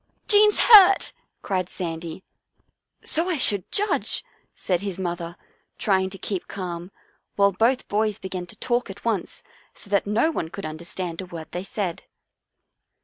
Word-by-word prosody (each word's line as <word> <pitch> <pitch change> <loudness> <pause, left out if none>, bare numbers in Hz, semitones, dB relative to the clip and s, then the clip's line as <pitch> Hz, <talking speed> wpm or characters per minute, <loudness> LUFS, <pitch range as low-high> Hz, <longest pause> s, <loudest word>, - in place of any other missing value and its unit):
" - - -45
Jean's 420 0 +6
hurt," 400 -4 +7 0.3
cried 185 -2 -1
Sandy. 170 0 -6 0.4
" - - -45
So 335 +4 +2
I 345 - 0
should 205 -8 0
judge," 415 +1 +2 0.3
said 180 -2 -1
his 195 -2 -5
mother, 175 -2 -4 0.4
trying 190 -2 +1
to 195 - -10
keep 190 -1 -4
calm, 180 -2 -6 0.5
while 200 0 +4
both 230 +7 +1
boys 210 0 0
began 185 -2 -5
to - - -11
talk 245 -2 -1
at 195 +3 -10
once, 215 -6 -2 0.3
so 200 - -12
that 200 0 +2
no 225 +10 +2
one 165 - -3
could 200 - -7
understand 170 +2 -5
a 185 - -8
word 160 -3 -9
they 180 - -4
said. 195 -5 -4
190 Hz, 160 wpm, -24 LUFS, 175-225 Hz, 0.5 s, hurt